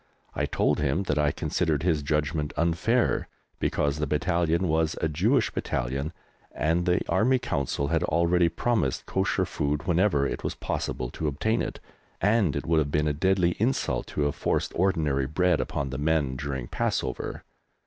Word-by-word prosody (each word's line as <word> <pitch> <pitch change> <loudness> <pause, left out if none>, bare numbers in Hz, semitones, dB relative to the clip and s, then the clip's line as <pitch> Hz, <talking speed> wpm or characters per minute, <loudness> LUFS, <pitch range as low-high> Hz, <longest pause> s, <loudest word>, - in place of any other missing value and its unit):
I - - -1
told - - +1
him 75 +6 +1
that 75 -5 0
I 75 -1 +3
considered 75 0 -1
his 80 -4 +2
judgment 75 +1 -1
unfair, 90 +9 +1 0.3
because 70 0 0
the 75 - 0
battalion 85 +3 +1
was 80 0 +1
a - - +1
Jewish 105 - +2
Battalion, 70 +5 -2 0.4
and 85 +4 0
the 90 0 +1
Army 110 +9 +3
Council 70 - -2
had 85 -1 +1
already 85 +1 +3
promised 85 - 0
Kosher - - 0
food 75 0 -2
whenever 90 -5 +2
it - - -3
was - - -2
possible 65 -1 -3
to 80 - -3
obtain 90 +11 0
it, - - -4 0.4
and 105 - +2
it - - -3
would 80 -1 +3
have 75 -2 0
been 75 +1 +1
a 75 - +1
deadly 90 +3 +2
insult 110 - 0
to - - -3
have 75 0 +1
forced - - -1
ordinary 75 -8 +1
bread 90 +3 +2
upon 70 -2 -3
the 65 - -4
men 75 -3 +1
during 65 -3 -4
Passover. - - -2
80 Hz, 170 wpm, -27 LUFS, 70-90 Hz, 0.4 s, I